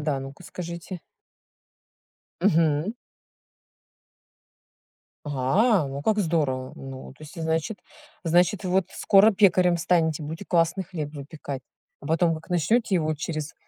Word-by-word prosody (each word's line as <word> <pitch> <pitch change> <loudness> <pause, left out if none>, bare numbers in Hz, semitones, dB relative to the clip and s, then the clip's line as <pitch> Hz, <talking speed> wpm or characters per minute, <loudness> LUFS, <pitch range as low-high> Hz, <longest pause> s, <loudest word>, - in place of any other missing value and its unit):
да, 150 -3 -1
ну-ка 135 +6 -9
скажите. 170 +1 -7 1.4
Мгм. 165 0 +2 2.3
Ага, 150 - +2
ну 140 +1 -5
как 215 +3 +1
здорово. 145 -8 0
Ну, 135 -1 -9
то 145 - -18
есть, 160 +3 -9
значит 160 +5 -1 0.5
значит, 175 +4 +2
вот 185 0 +1
скоро 200 +3 +5
пекарем 185 -3 +4
станете, 160 -2 +1
будете 160 +6 -6
классный 170 +2 +1
хлеб 155 -4 -5
выпекать. 140 -2 -7 0.4
А 145 - -10
потом 165 +1 +2
как 160 - -10
начнёте 190 +5 +2
его 155 -2 +1
через 155 0 -4
165 Hz, 120 wpm, -25 LUFS, 150-180 Hz, 2.3 s, скоро